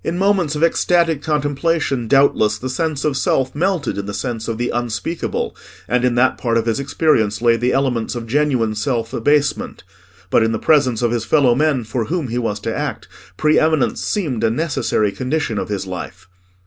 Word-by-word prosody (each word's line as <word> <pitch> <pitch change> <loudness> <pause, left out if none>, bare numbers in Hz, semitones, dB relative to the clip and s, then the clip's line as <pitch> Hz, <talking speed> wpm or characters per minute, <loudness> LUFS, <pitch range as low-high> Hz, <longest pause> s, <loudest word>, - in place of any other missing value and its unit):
In 170 - -2
moments 190 -5 +1
of 150 - -1
ecstatic 170 -2 +2
contemplation, 145 -3 -1
doubtless, 110 -5 +3
the 130 +4 -5
sense 155 -1 -2
of 150 -3 +1
self 130 -1 0
melted 165 - -1
in 100 - -5
the 100 - -4
sense 115 0 -4
of 115 -1 -3
the 120 +1 -1
Unspeakable, 120 +7 -3 0.3
and 125 0 +1
in 125 -1 +2
that 125 +1 +2
part 115 -2 0
of 115 - 0
his 115 +2 0
experience 130 -7 +1
lay 115 0 +3
the 120 +2 0
elements 125 -4 0
of 120 -1 -5
genuine 125 -3 +1
self 115 +1 -2
abasement; 145 +4 0 0.5
but - - +4
in 110 0 +1
the - - 0
presence 130 -4 +2
of 120 - +2
his 120 -2 -1
fellow 135 -2 +3
men 145 -1 +1
for 110 +1 -3
whom 160 -4 -2
he 120 +2 -1
was 105 -3 -2
to 115 +1 -3
act, - - -4 0.3
pre 155 0 +3
eminence 155 -8 +1
seemed 145 - -2
a 115 - +4
necessary 115 -6 0
condition 130 -3 -2
of - - -4
his 100 -2 -3
life. 90 -1 -7
125 Hz, 195 wpm, -19 LUFS, 115-150 Hz, 0.5 s, but